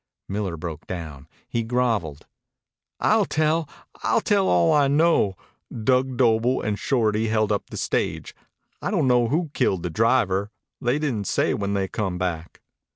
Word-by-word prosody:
Miller 95 -4 -3
broke 80 -1 -7
down. 80 -6 -7 0.2
He 115 - -1
groveled. 115 - -1 0.7
"I'll - - +3
tell. 155 0 0 0.3
I'll - - +2
tell 205 -3 +2
all 85 -1 +4
I 145 -2 +4
know. 145 - +2 0.3
Dug 125 +3 0
Doble 120 +1 +3
and 105 -3 -2
Shorty 110 -4 +1
held 110 -1 +1
up 100 - -2
the - - -7
stage. - - -2 0.5
I - - -2
don' 180 -8 +1
know 125 -2 +3
who 155 +4 -1
killed 95 -3 0
the 90 - -3
driver. 105 -2 +2 0.3
They 120 +3 +1
didn't 125 -10 -2
say - - +1
when 100 0 -2
they 95 -1 0
come 95 -3 -3
back." 85 -3 -4
110 Hz, 155 wpm, -24 LUFS, 95-130 Hz, 0.7 s, all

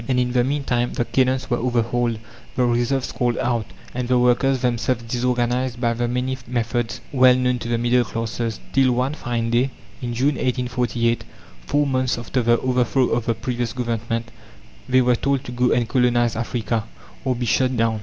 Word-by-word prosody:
And 125 -1 +2
in 125 0 +1
the 125 -1 +3
meantime 130 -3 0
the 120 - -1
cannons 130 0 +1
were 120 - +2
overhauled, 120 -1 0 0.4
the 125 - +2
reserves 120 +2 0
called 120 -2 0
out, 115 -4 0 0.3
and 125 0 -3
the 125 0 +3
workers 125 +2 +3
themselves 120 -1 0
disorganized 125 +1 -1
by 120 -1 +1
the 120 +1 -1
many 125 +2 -2
methods 120 0 -2
well 130 -2 +6
known 125 -1 +1
to 115 - -6
the 120 0 +1
middle 120 +1 +3
classes, 115 +1 -3
till 130 -2 +4
one 130 +4 0
fine 120 -5 -2
day, 125 +3 +2 0.3
in 120 -2 -3
June, 135 +3 +1
1848, 125 -2 0 0.4
four 145 0 +2
months 130 -2 0
after 125 +2 -1
the 120 0 +3
overthrow 125 0 +2
of 115 -1 -1
the 115 - +1
previous 120 -1 -3
Government, 115 -1 -3 0.6
they 130 0 +5
were 125 0 +3
told 140 +2 0
to 125 - -7
go 125 0 +1
and 120 -1 +2
colonize 120 -1 +2
Africa, 115 -1 -2 0.4
or 130 -2 0
be 120 0 -2
shot 125 +3 +1
down. 115 -1 +1
120 Hz, 185 wpm, -22 LUFS, 120-125 Hz, 0.6 s, well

